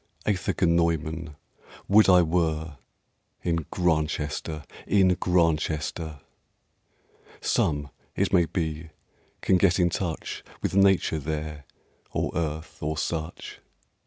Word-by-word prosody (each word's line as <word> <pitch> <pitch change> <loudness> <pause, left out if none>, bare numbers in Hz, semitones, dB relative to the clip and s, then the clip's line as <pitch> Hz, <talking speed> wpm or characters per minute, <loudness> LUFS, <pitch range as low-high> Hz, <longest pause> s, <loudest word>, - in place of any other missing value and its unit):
[Greek: 105 - +3
eithe 90 - -2
genoimên]... 85 -2 +1 0.5
Would 105 +1 +6
I 90 -1 +7
were 80 -2 -1 0.7
In 85 -3 -1
Grantchester, 75 -2 -1 0.2
in 95 -2 +4
Grantchester! 80 -4 0 1.2
Some, 75 -3 0 0.2
it 100 0 0
may 90 -3 +5
be, 80 -1 -3 0.5
can 95 - +4
get 90 -1 +3
in 85 -1 +3
touch 85 -3 -3 0.2
With - - -1
Nature 95 -5 +4
there, 75 0 -4 0.5
or - - -1
Earth, 80 -1 -4
or 75 +1 -2
such. 80 +2 -4
80 Hz, 105 wpm, -26 LUFS, 75-90 Hz, 1.2 s, I